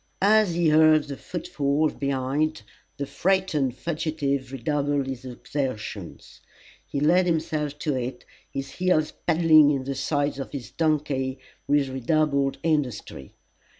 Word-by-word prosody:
As 210 Hz, -3 st, +4 dB
he 170 Hz, -2 st, +3 dB
heard 155 Hz, 0 st, +6 dB
the 140 Hz, -1 st, -6 dB
footfalls 150 Hz, -2 st, -1 dB
behind, 140 Hz, +3 st, -1 dB, 0.3 s
the 140 Hz, -, -2 dB
frightened 165 Hz, -7 st, 0 dB
fugitive 150 Hz, -5 st, -2 dB
redoubled 145 Hz, +1 st, -1 dB
his 130 Hz, -1 st, -6 dB
exertions. 130 Hz, -2 st, -5 dB, 0.5 s
He 140 Hz, -, -3 dB
laid 175 Hz, +5 st, +4 dB
himself 155 Hz, -3 st, -1 dB
to 150 Hz, 0 st, -1 dB
it, 125 Hz, -1 st, -4 dB, 0.2 s
his 135 Hz, 0 st, -5 dB
heels 180 Hz, -4 st, +1 dB, 0.2 s
paddling 160 Hz, -3 st, +6 dB
in 140 Hz, -3 st, 0 dB
the 135 Hz, +1 st, -3 dB
sides 145 Hz, +1 st, -1 dB
of 135 Hz, -, -6 dB
his 135 Hz, -4 st, -6 dB
donkey 145 Hz, -4 st, 0 dB, 0.3 s
with 145 Hz, -2 st, +2 dB
redoubled 140 Hz, +1 st, +1 dB
industry. 130 Hz, -, -2 dB
145 Hz, 125 wpm, -25 LUFS, 135-155 Hz, 0.5 s, heard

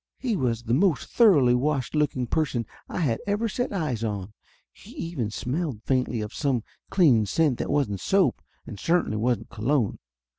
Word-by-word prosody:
He 245 Hz, -5 st, -1 dB
was 120 Hz, -, -1 dB
the 115 Hz, 0 st, -1 dB
most 165 Hz, +1 st, +2 dB
thoroughly 155 Hz, -, +5 dB
washed 130 Hz, -1 st, 0 dB
looking 150 Hz, -4 st, 0 dB
person 125 Hz, -3 st, -1 dB, 0.2 s
I -, -, -3 dB
had 120 Hz, -8 st, +1 dB
ever 205 Hz, +3 st, 0 dB
set 245 Hz, +4 st, -2 dB
eyes 150 Hz, -, -2 dB
on. 105 Hz, -2 st, -3 dB, 0.4 s
He -, -, -17 dB
even 145 Hz, -11 st, -3 dB
smelled 130 Hz, +1 st, -3 dB
faintly 125 Hz, -3 st, 0 dB
of 105 Hz, +1 st, -6 dB
some 135 Hz, -6 st, 0 dB, 0.3 s
clean 130 Hz, -, +4 dB
scent 150 Hz, 0 st, +1 dB
that -, -, -3 dB
wasn't 135 Hz, -10 st, 0 dB
soap 185 Hz, -, +2 dB, 0.2 s
and 105 Hz, -, -9 dB
certainly 165 Hz, -10 st, +1 dB
wasn't 115 Hz, -1 st, 0 dB
cologne. 115 Hz, 0 st, 0 dB
130 Hz, 170 wpm, -26 LUFS, 115-165 Hz, 0.4 s, thoroughly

